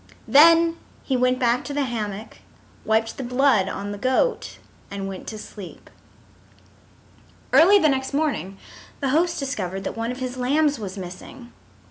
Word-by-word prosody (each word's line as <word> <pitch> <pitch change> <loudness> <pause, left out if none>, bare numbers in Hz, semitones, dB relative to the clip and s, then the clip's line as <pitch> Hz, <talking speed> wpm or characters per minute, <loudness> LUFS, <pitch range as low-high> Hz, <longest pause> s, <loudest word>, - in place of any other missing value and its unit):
Then 330 +3 +6 0.3
he 265 - -1
went 255 0 +2
back 245 -1 +1
to 285 - -5
the 290 - +1
hammock, 215 -4 -5 0.5
wiped 220 +1 0
the 270 - -4
blood 250 -5 +2
on 200 +1 -5
the 205 - -7
goat, 260 - 0 0.3
and 200 -1 -5
went 190 -1 -8
to 220 - -6
sleep. 205 -3 -11 1.6
Early 385 +5 +7
the 320 - +3
next 265 -2 -1
morning 280 -10 -2 0.4
the 275 - -1
host 335 +5 +1
discovered 195 - -4
that - - -4
one 230 +1 -3
of 250 - -6
his 255 -1 -5
lambs 285 +3 +1
was 200 -2 -6
missing. 190 +7 -10
250 Hz, 155 wpm, -23 LUFS, 210-285 Hz, 1.6 s, Early